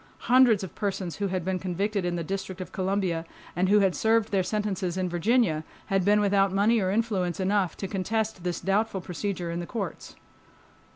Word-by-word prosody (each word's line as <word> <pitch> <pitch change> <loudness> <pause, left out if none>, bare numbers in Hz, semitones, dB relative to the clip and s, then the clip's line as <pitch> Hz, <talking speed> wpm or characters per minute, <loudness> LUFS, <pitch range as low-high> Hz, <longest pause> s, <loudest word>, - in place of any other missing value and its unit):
Hundreds 245 -6 +6
of 190 - -7
persons 190 -4 -3
who 200 - -1
had 185 -2 -2
been 185 -1 -1
convicted 195 +3 -1
in 175 0 -1
the 170 - -2
District 190 +1 -4
of 185 - -6
Columbia 185 -3 -1 0.3
and 185 +1 +1
who 205 +1 +5
had 190 -2 +3
served 225 +1 +2
their 195 -2 +3
sentences 190 -3 -2
in 185 -1 0
Virginia 175 -2 +1 0.3
had 195 -1 +3
been 205 +2 +4
without 200 -1 +3
money 210 +4 +3
or 185 -2 0
influence 195 -5 0
enough 190 -2 +1
to 195 - -4
contest 210 +1 -2
this 175 -1 -2
doubtful 200 +1 0
procedure 180 -1 -4
in 170 - -3
the 175 - -5
courts. 200 -7 -5
195 Hz, 190 wpm, -27 LUFS, 180-210 Hz, 0.3 s, Hundreds